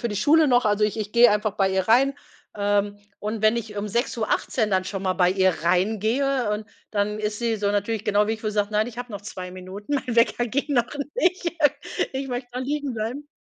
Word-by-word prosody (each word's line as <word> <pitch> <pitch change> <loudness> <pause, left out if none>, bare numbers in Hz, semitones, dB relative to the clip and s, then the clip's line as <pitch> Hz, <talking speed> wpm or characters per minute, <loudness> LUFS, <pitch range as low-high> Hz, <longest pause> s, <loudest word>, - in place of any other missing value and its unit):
für 235 - -1
die 205 - -4
Schule 310 +6 +4
noch, 245 -2 +4
also 210 0 +2
ich 215 +1 -1
ich 210 -1 -4
gehe 235 -1 +7
einfach 210 0 +1
bei 195 -1 +2
ihr 190 0 +1
rein, 270 +4 +4 0.4
ähm, 205 0 0 0.2
und 215 +1 -4
wenn 215 +2 +4
ich 215 -2 -5
um 205 - -2
6:18 225 0 -1
dann 185 -1 +1
schon 195 0 -5
mal 185 -1 +1
bei 180 -1 +3
ihr 190 0 +3
reingehe 220 +8 +1
und 210 0 -3 0.2
dann 210 0 -1
ist 210 0 -2
sie 230 -2 0
so 205 -1 0
natürlich 205 +1 -1
genau 210 0 +2
wie 220 - 0
ich, 220 - -6
wo - - -4
sie 210 - -5
sagt: 205 0 0
„Nein, 215 +1 +1
habe 245 -2 -6
noch 200 - -5
2 185 -3 -7
Minuten, 185 +7 -6
mein 250 -4 -2
Wecker 240 +1 +3
ging 280 +5 -2
noch 240 -1 +3 0.3
nicht. 365 -6 +1 0.6
Ich 270 +1 -4
möchte 245 0 -4
noch 260 - -3
liegen 285 -1 -2
bleiben.“ 240 +7 -4
215 Hz, 230 wpm, -24 LUFS, 205-245 Hz, 0.6 s, gehe